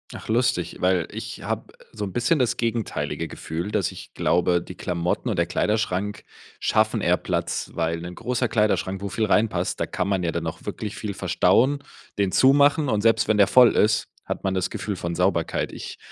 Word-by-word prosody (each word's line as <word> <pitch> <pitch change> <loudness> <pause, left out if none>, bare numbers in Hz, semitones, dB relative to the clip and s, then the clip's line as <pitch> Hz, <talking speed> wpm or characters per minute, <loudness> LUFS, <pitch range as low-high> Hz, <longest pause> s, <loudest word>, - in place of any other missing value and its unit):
Ach - - -10
lustig, 115 -6 +1
weil 90 -2 +2
ich - - -7
habe - - -4 0.2
so 105 -2 -4
'n 95 - -7
bisschen 125 +6 +2
das 125 -3 +1
gegenteilige 115 -2 -2
Gefühl, 85 +6 -5
dass 100 -5 0
ich - - -11
glaube, 85 +2 +2
die 90 - -10
Klamotten 90 -1 -2
und - - -1
der - - +2
Kleiderschrank 105 -2 -1 0.4
schaffen - - +2
eher - - +3
Platz, - - -2
weil 85 0 -1
'nen 90 +1 -7
großer 125 0 -1
Kleiderschrank, 105 -4 0
wo 100 - -3
viel 110 +3 0
reinpasst, 100 -4 +1
da - - +2
kann 90 - -2
man 95 -2 0
ja 85 - 0
dann 85 -1 -3
auch 80 - -7
wirklich 105 -2 -5
viel 105 -2 -4
verstauen, 95 +10 +2 0.4
den 100 -2 +1
zumachen 145 - +5
und 110 -4 +1
selbst 115 +1 +3
wenn 110 - +2
der 100 -2 +6
voll 125 +3 +6
ist, 110 +1 +3 0.2
hat - - -5
man 95 - +1
das 95 -1 -1
Gefühl 100 0 -4
von 85 -1 -4
Sauberkeit. 90 -1 0
Ich - - -7
100 Hz, 195 wpm, -24 LUFS, 90-115 Hz, 0.4 s, der